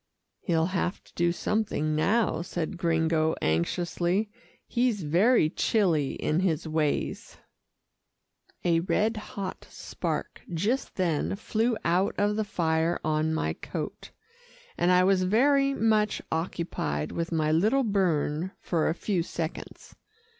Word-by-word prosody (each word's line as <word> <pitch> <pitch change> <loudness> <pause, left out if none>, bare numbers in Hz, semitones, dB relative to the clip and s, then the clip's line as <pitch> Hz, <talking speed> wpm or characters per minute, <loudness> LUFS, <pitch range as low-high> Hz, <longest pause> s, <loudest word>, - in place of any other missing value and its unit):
"He'll 165 -4 +1
have 180 0 -1
to - - -22
do 170 0 +2
something 175 -5 -1
now," 195 +1 +2
said 175 +1 -4
Gringo 160 -2 +1
anxiously. 175 - 0 0.3
"He's 235 -6 0
very 175 +5 +4
chilly 165 - +1
in 155 - 0
his 165 -4 0
ways." 155 -2 -2 1.3
A 170 -1 +3
red 210 +6 +1
hot 200 -3 -6
spark - - -4
just 205 +11 -1
then 175 -2 0
flew 220 +3 0
out 180 +4 +2
of 205 +1 +1
the 215 - 0
fire 165 -3 0
on 155 0 +1
my - - -1
coat, - - -6 0.7
and 175 - +2
I 180 0 +5
was 190 0 +3
very 275 +8 +3
much 215 -2 +2
occupied 160 - -2
with 170 0 -3
my 155 -2 +1
little 215 +12 +3
burn 180 - 0
for 165 -3 0
a 160 - -1
few 190 -3 -1
seconds. 165 -1 -6
175 Hz, 125 wpm, -27 LUFS, 160-210 Hz, 1.3 s, I